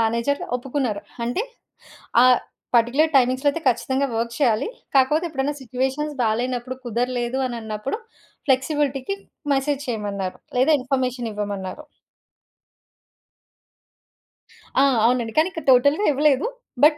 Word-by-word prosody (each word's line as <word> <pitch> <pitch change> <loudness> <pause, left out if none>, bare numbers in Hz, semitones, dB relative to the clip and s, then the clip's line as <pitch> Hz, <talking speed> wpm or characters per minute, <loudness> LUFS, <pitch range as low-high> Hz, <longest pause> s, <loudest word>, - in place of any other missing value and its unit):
Manager 235 +5 +1 0.2
ఒప్పుకున్నారు. 250 -5 -2 0.2
అంటే, 245 - -1 0.8
ఆహ్, 255 -1 +6 0.4
పర్టిక్యులర్ 275 +7 +3
టైమింగ్స్‌లో 260 +2 +3
అయితే 325 +3 -5
ఖచ్చితంగా 265 +3 +1
వర్క్ 235 +1 -2
చేయాలి 235 - +2 0.3
కాకపోతే, 300 +6 +4
ఎప్పుడైనా 285 -1 -2
సిచ్యువేషన్స్ 265 +4 -2
బాలేనప్పుడు, 245 +3 -1
కుదరలేదు 245 +2 -1
అనన్నప్పుడు, 230 - -4 0.5
ఫ్లెక్సిబిలిటీ‌కి 275 +5 +1 0.4
మెసేజ్ 275 +1 0
చేయమన్నారు 200 -4 -3 0.2
లేదా, 300 +5 +5
ఇన్ఫర్మేషన్ 255 -3 -1
ఇవ్వమన్నారు. 200 -3 -5 3.0
ఆ! - - +6 0.2
అవునండి. 235 -2 +1
కానీ, 315 - +5
ఇక్కడ 325 -4 -7
టోటల్‌గా 285 +10 +4
ఇవ్వలేదు. 285 -1 +3 0.4
బట్, 300 0 +7
255 Hz, 105 wpm, -23 LUFS, 235-285 Hz, 3.0 s, బట్